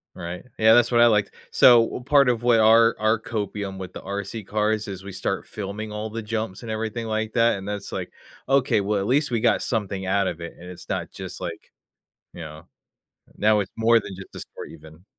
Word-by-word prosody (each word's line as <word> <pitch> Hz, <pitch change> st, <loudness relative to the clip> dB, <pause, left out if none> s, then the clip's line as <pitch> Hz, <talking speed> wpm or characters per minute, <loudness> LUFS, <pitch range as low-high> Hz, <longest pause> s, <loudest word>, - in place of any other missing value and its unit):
Right? 85 Hz, +4 st, -7 dB
Yeah, 110 Hz, 0 st, +6 dB
that's 120 Hz, 0 st, +4 dB
what 120 Hz, -, +5 dB
I 120 Hz, -, +8 dB
liked. 105 Hz, -2 st, +2 dB, 0.2 s
So, 120 Hz, -2 st, +7 dB
what 120 Hz, +2 st, -4 dB
part 140 Hz, -2 st, +5 dB
of 120 Hz, -2 st, 0 dB
where 120 Hz, -2 st, +4 dB
our 115 Hz, +1 st, +6 dB
our 110 Hz, +1 st, +2 dB
copium 105 Hz, -3 st, -4 dB
with 95 Hz, -1 st, -7 dB
the -, -, -9 dB
RC 100 Hz, +2 st, -5 dB
cars 105 Hz, 0 st, 0 dB
is 95 Hz, -1 st, -7 dB
we 100 Hz, -, -8 dB
start 95 Hz, +1 st, -3 dB
filming 105 Hz, +1 st, -6 dB
all 105 Hz, +1 st, -4 dB
the 115 Hz, +1 st, -5 dB
jumps, 110 Hz, -2 st, -4 dB
and 115 Hz, -, -5 dB
everything 110 Hz, +1 st, -3 dB
like 110 Hz, 0 st, -2 dB
that, 115 Hz, -3 st, +3 dB
and 95 Hz, -, -8 dB
then 105 Hz, -, -2 dB
it's 100 Hz, -, -8 dB
like, -, -, -5 dB, 0.3 s
"Okay, 130 Hz, -4 st, +3 dB
well, 100 Hz, +1 st, 0 dB
at 100 Hz, -, -2 dB
least 145 Hz, +3 st, +2 dB
we 115 Hz, -3 st, -1 dB
got 120 Hz, -, +3 dB
something 100 Hz, -4 st, -2 dB
out 100 Hz, +1 st, +1 dB
of 85 Hz, -, -4 dB
it," 85 Hz, 0 st, -7 dB
and 90 Hz, +1 st, -11 dB
it's 90 Hz, -, -11 dB
not -, -, -3 dB
just, -, -, -8 dB
like, -, -, -7 dB, 0.6 s
you -, -, -9 dB
know 75 Hz, -1 st, -10 dB, 0.7 s
Now 105 Hz, 0 st, +3 dB
it's 100 Hz, -, -5 dB
more 115 Hz, +1 st, +4 dB
than 100 Hz, -2 st, -8 dB
just 95 Hz, -, -12 dB
a -, -, -6 dB
story -, -, -9 dB
even. 80 Hz, +2 st, -15 dB
110 Hz, 230 wpm, -24 LUFS, 95-115 Hz, 0.7 s, I